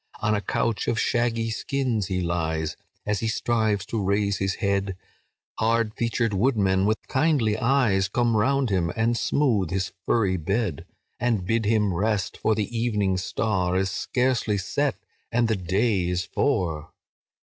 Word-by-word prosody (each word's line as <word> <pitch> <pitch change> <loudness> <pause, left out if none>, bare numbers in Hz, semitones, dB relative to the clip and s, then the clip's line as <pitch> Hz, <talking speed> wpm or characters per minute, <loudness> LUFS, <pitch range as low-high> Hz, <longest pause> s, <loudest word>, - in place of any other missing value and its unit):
"On 105 - +1
a 105 - 0
couch 110 +3 -1
of 115 - +1
shaggy 115 -1 0
skins 125 -4 -1
he 90 -1 -1
lies; 80 -2 -1 0.3
As 105 -1 0
he 115 - -2
strives 110 -3 0
to 110 0 -2
raise 100 +1 +1
his 95 0 0
head, 100 -3 -1 0.6
Hard 115 -1 +1
featured 115 -1 0
woodmen, 100 -3 +2
with 110 +1 +2
kindly 135 -7 +2
eyes 115 -5 +2
Come 120 +2 +1
round 130 +2 +2
him 85 -4 +1
and 115 +2 +1
smooth 115 - +1
his 95 +1 -2
furry 100 -5 +2
bed, 95 - -2 0.3
And 115 -6 0
bid 115 +2 0
him 105 -2 +2
rest, 100 +1 0
for 110 - +1
the 110 +2 -3
evening 105 -5 +1
star 95 -1 -1
Is 95 0 0
scarcely 125 -3 0
set, 140 +8 -1 0.4
and 120 0 +2
the 110 - +1
day 95 0 0
is 90 0 -1
for. 90 - -1
105 Hz, 155 wpm, -25 LUFS, 95-115 Hz, 0.6 s, woodmen